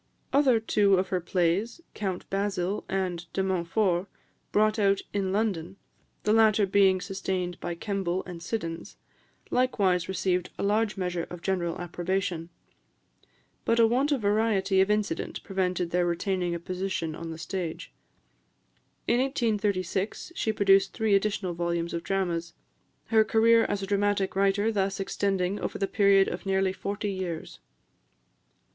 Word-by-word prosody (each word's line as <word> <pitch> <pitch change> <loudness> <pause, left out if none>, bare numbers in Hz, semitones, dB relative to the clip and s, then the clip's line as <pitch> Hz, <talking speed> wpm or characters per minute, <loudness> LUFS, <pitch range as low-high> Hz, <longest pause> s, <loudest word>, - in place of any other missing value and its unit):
Other 270 -5 +4
two 205 -3 +3
of 185 0 0
her 185 -1 0
plays, 180 - 0
"Count 190 -4 -4
Basil" 195 -1 -1
and 180 -3 -2
"De 190 - 0
Montfort," 185 0 0 0.4
brought 215 +1 +2
out 200 -1 +3
in 195 -2 0
London, 190 -4 -1 0.5
the 210 - +2
latter 220 -2 +5
being 190 -1 +4
sustained 185 -1 -3
by 170 - -4
Kemble 190 -1 -2
and 175 -2 -8
Siddons, 170 -1 -5 0.5
likewise 195 -9 +1
received 185 -1 0
a - - -3
large 210 +1 +1
measure 180 -2 -2
of 175 -1 -9
general 175 -3 -1
approbation; 175 -1 -2 1.1
but 230 - +2
a 230 - +7
want 260 +6 +2
of 275 -5 +1
variety 205 -2 +2
of 190 - +2
incident 210 -5 -1
prevented 180 -2 -1
their 175 0 +2
retaining 175 0 -1
a - - -4
position 180 -2 -3
on 165 +1 -7
the 160 - -6
stage. 175 -1 -5 1.1
In 240 - +3
1836, 210 - -1
she 225 - 0
produced 195 -2 +4
three 220 -3 +1
additional 195 -2 +1
volumes 170 0 -2
of 170 - -2
dramas; 170 -3 -2 0.6
her 220 -1 +7
career 225 +1 +4
as 200 -1 -2
a - - -1
dramatic 200 -1 0
writer 200 +3 +2
thus 195 -2 -1
extending 195 0 -1
over - - -3
the 195 - 0
period 200 -1 +4
of - - -5
nearly 190 -1 +1
forty 200 +1 -3
years. 180 -4 -5
195 Hz, 145 wpm, -27 LUFS, 180-205 Hz, 1.1 s, a